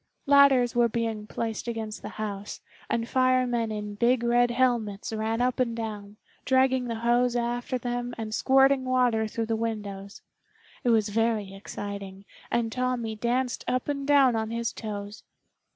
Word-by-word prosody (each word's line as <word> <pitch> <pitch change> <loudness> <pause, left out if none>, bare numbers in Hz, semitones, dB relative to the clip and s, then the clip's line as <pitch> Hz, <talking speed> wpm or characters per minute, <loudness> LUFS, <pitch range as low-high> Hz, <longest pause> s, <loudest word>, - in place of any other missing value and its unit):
Ladders 275 -4 +5
were 240 -1 +4
being 225 -2 -3
placed 225 +1 -4
against 225 -2 -4
the - - -6
house, 205 -2 -5 0.3
and 230 0 -1
firemen 255 -3 +2
in 210 -1 -4
big 235 +3 +2
red 240 0 +3
helmets 235 -5 0
ran 220 +2 -1
up 250 0 0
and 235 -2 +1
down, 210 -2 -6 0.3
dragging 260 -1 +3
the 230 -1 -3
hose 245 +1 +3
after 240 +1 -1
them 245 0 -3
and 220 -1 -5
squirting 270 +2 +4
water 250 -4 +2
through 225 +1 -3
the 225 0 -1
windows. 205 -3 -5 0.6
It 245 - +2
was 220 -2 +3
very 220 -2 0
exciting 200 -1 -7 0.2
and 230 -1 0
Tommy 250 -3 -2
danced 245 +3 -1
up 255 0 -1
and 280 -1 -3
down 275 -4 +5
on 220 0 -1
his 230 +1 -2
toes. 205 -1 -6
235 Hz, 155 wpm, -27 LUFS, 215-250 Hz, 0.6 s, Ladders